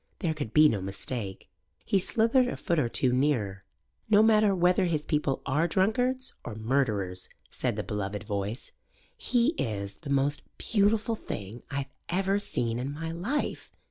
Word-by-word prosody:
There 165 -5 -1
could 145 -8 -5
be 155 +3 +7
no 105 -9 0
mistake. 95 +1 -5 0.4
He 195 - +3
slithered 230 +6 +3
a - - -3
foot 170 -4 0
or 120 -5 +1
two 125 +1 +2
nearer. 120 -8 0 0.5
"No 215 0 +6
matter 215 -2 +5
whether 180 +1 +3
his 155 -4 -1
people 150 -3 0
are 150 +5 +2
drunkards 245 +8 +1
or 110 - -6
murderers," 110 -6 -1 0.2
said - - -1
the - - -2
beloved 105 0 -3
voice, 100 +4 -4 0.4
"he 245 +1 +2
is 100 -4 -3
the 150 - -9
most 140 +1 +1 0.2
beautiful 215 +1 +2
thing 110 - -6
I've 140 -1 -4 0.2
ever 195 +3 +1
seen 120 - -1
in 130 +3 -3
my 160 +3 -4
life. 205 - -3
145 Hz, 160 wpm, -28 LUFS, -, 0.5 s, be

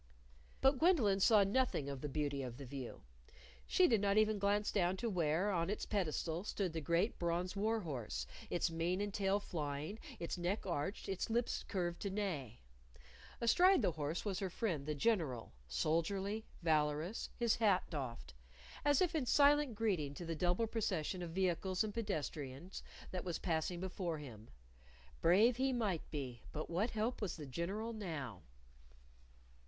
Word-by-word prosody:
But 270 0 +4
Gwendolyn 255 - +4
saw 210 +1 +6
nothing 200 - +1
of 140 -2 -5
the 150 - -3
beauty 140 -1 -1
of 125 -2 -5
the 140 - -7
view. 130 -1 -7 0.6
She 370 - +5
did 225 -5 +3
not 200 0 +2
even 215 -1 +4
glance 205 +1 +2
down 185 -2 +1
to 230 +3 -1
where, 175 +2 +1
on 170 -1 0
its 210 - -2
pedestal, 170 -3 -1
stood 195 -4 -2
the 160 - -2
great 170 +8 +1
bronze 175 +2 -1
war 220 +2 +1
horse, 120 - -4 0.2
its 175 0 +1
mane 170 +3 0
and 205 -1 -2
tail 195 0 +2
flying, 155 +1 -4 0.2
its 175 -1 -4
neck 180 +5 -1
arched, 170 +1 -2
its 190 +2 -2
lips 235 +1 0
curved 175 -3 -2
to 200 - -1
neigh. 175 - -3 0.8
Astride 355 +11 +5
the - - +3
horse 155 +3 -3
was 195 -3 -1
her 195 - -2
friend, 170 -7 -2
the 150 - -1
General, 145 - 0
soldierly, 195 - 0 0.2
valorous, 155 +4 +1
his 235 -2 +2
hat 205 -5 +4
doffed 125 - -5 0.5
as 290 -2 +4
if 355 -1 0
in 295 -6 0
silent 285 -2 +5
greeting 180 -11 0
to 175 - -6
the 165 - -2
double 180 +7 +1
procession 190 -6 -1
of 175 - -4
vehicles 185 +2 +1
and 215 -1 -3
pedestrians 155 - -4 0.3
that 185 -1 -3
was 175 -2 -2
passing 170 0 -1
before 180 -2 -3
him. 115 -7 -10 0.7
Brave 215 +8 +5
he 265 +1 +2
might 210 -9 -1
be, 130 -6 -5
but 155 +2 -5
what 195 +8 +1
help 225 +3 -1
was 200 -5 -2
the 155 - -7
General 190 - -3
_now? 155 - -5
180 Hz, 165 wpm, -37 LUFS, 155-210 Hz, 0.8 s, saw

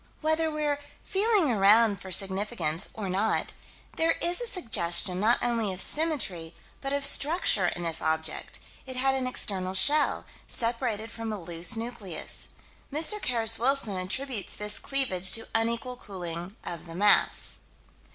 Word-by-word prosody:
Whether 315 +1 +1
we're 300 -2 -2 0.2
feeling 400 - +1
around 210 0 +3
for 190 - -10
significance 195 -3 0
or 210 -3 -5
not, 195 +4 -1 0.4
there 330 0 +2
is 350 +6 0
a 485 - -3
suggestion 185 - +3
not 225 +4 +3
only 230 -4 -1
of 185 - -7
symmetry 205 - 0 0.3
but 275 - -4
of 280 0 +4
structure 280 - +4
in 175 - -4
this 165 -1 0
object: 160 0 -2 0.3
it 260 - -6
had 265 +1 +1
an 260 -1 -2
external 190 -6 -2
shell, 290 +10 +3 0.2
separated 230 -2 -2
from 225 -1 -5
a 210 - -5
loose 170 +4 0
nucleus. 225 -7 -4 0.4
Mr. 325 +9 +2
Carus 225 -5 +2
Wilson 245 -4 +1
attributes 210 +4 -2
this 210 0 -2
cleavage 190 -10 +2
to 225 - +1
unequal 235 +2 -2
cooling 175 -3 -8
of 170 0 -7
the 165 - -9
mass. 205 +3 +3
225 Hz, 145 wpm, -27 LUFS, 185-270 Hz, 0.4 s, of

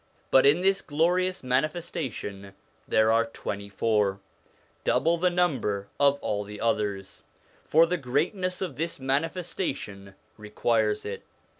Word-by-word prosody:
But 135 +1 +6
in 150 +5 +4
this 195 +1 +2
glorious 180 +4 0
manifestation 130 - -3 0.3
there 110 0 +3
are 115 +1 +3
twenty 100 -2 -6
four, 100 -1 +1 0.6
double 165 +1 +2
the 180 +2 +2
number 130 - 0
of 140 0 +4
all 105 0 -1
the 105 +1 -9
others, 105 -4 -2 0.4
for 165 +2 +5
the 180 +2 -1
greatness 170 +7 -1
of 185 - -5
this 165 -1 -3
manifestation 135 - -3 0.2
requires 105 0 0
it. 105 - -5
130 Hz, 125 wpm, -27 LUFS, 105-170 Hz, 0.6 s, But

